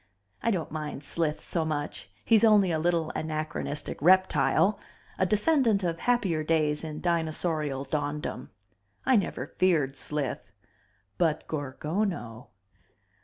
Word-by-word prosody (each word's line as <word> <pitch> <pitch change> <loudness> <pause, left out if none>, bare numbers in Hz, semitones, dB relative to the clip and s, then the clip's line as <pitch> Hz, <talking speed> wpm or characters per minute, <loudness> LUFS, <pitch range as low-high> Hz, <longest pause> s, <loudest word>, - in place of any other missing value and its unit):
I - - +1
don't 180 -8 -1
mind 150 -2 -5
Slith 155 0 -2
so 165 - -1
much, 150 -2 -4 0.2
he's 225 -2 +5
only 210 -5 +5
a 160 - 0
little 165 -1 +1
anachronistic 155 -2 -4
reptile, 190 +3 +4 0.4
a 185 - +3
descendent 215 - +2
of 170 -1 -1
happier 195 -11 +1
days 155 -1 +1
in 155 -1 -6
dinosaurial 160 -4 0
dawndom. 145 -2 -3 0.6
I 260 - +4
never 190 - 0
feared 155 -4 +1
Slith. 135 -7 -3 0.7
But 160 -3 +1
Gorgono! 150 - -3
160 Hz, 120 wpm, -28 LUFS, 150-185 Hz, 0.7 s, he's